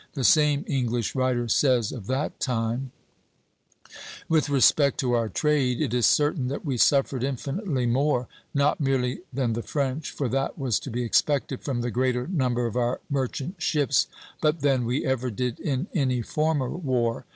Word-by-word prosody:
The 135 Hz, -, -2 dB
same 150 Hz, 0 st, +4 dB
English 120 Hz, -5 st, -1 dB
writer 130 Hz, -2 st, 0 dB
says 125 Hz, -2 st, +2 dB
of 110 Hz, -6 st, -8 dB
that 135 Hz, +3 st, -2 dB
time: 120 Hz, +1 st, -1 dB, 1.4 s
"With 155 Hz, -3 st, +2 dB
respect 140 Hz, 0 st, +4 dB
to 125 Hz, -2 st, 0 dB
our 115 Hz, -2 st, +1 dB
trade 135 Hz, +1 st, +1 dB
it -, -, -1 dB
is 120 Hz, -3 st, +3 dB
certain 145 Hz, -3 st, +2 dB
that 140 Hz, +6 st, -4 dB
we 135 Hz, -4 st, -1 dB
suffered 135 Hz, 0 st, +3 dB
infinitely 140 Hz, -, -2 dB
more, 125 Hz, 0 st, +1 dB, 0.2 s
not 140 Hz, +1 st, +1 dB
merely 130 Hz, -3 st, 0 dB
than 125 Hz, -3 st, -1 dB
the 115 Hz, -, -2 dB
French, 140 Hz, +6 st, -2 dB
for 140 Hz, -, -3 dB
that 135 Hz, +3 st, -1 dB
was 125 Hz, -6 st, 0 dB
to -, -, -8 dB
be 120 Hz, +1 st, -2 dB
expected 135 Hz, +2 st, +1 dB
from 130 Hz, -4 st, -2 dB
the 120 Hz, 0 st, -2 dB
greater 125 Hz, 0 st, 0 dB
number 125 Hz, -9 st, 0 dB
of 115 Hz, -, -3 dB
our 125 Hz, 0 st, 0 dB
merchant 140 Hz, -, -3 dB
ships, 145 Hz, -6 st, +2 dB, 0.3 s
but 155 Hz, 0 st, +1 dB
than 135 Hz, -4 st, +2 dB
we 125 Hz, +4 st, -1 dB
ever 130 Hz, -1 st, 0 dB
did 125 Hz, +2 st, -3 dB
in 140 Hz, +1 st, -1 dB
any 130 Hz, -7 st, 0 dB
former 150 Hz, -1 st, 0 dB
war.... 125 Hz, -8 st, -1 dB
130 Hz, 170 wpm, -25 LUFS, 120-145 Hz, 1.4 s, same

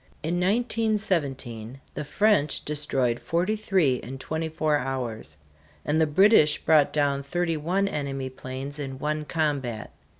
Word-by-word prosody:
In 170 Hz, +3 st, -1 dB
1917 180 Hz, -, -1 dB
the 150 Hz, -, -4 dB
French 180 Hz, -2 st, +2 dB
destroyed 135 Hz, -5 st, 0 dB
forty 180 Hz, +6 st, 0 dB
three 185 Hz, -11 st, +2 dB
in 130 Hz, +2 st, -8 dB
twenty 160 Hz, +4 st, -3 dB
four 155 Hz, -1 st, +1 dB
hours; 120 Hz, -, -4 dB, 0.5 s
and 155 Hz, +2 st, +2 dB
the 160 Hz, -, +4 dB
British 155 Hz, -1 st, +5 dB
brought 155 Hz, -3 st, +4 dB
down 140 Hz, -2 st, +1 dB
thirty 165 Hz, +4 st, -1 dB
one 180 Hz, +6 st, 0 dB
enemy 135 Hz, -6 st, -3 dB
planes 130 Hz, +3 st, -7 dB
in 135 Hz, -2 st, -5 dB
one 150 Hz, +2 st, -2 dB
combat. 140 Hz, -9 st, -2 dB
150 Hz, 135 wpm, -26 LUFS, 135-170 Hz, 0.5 s, British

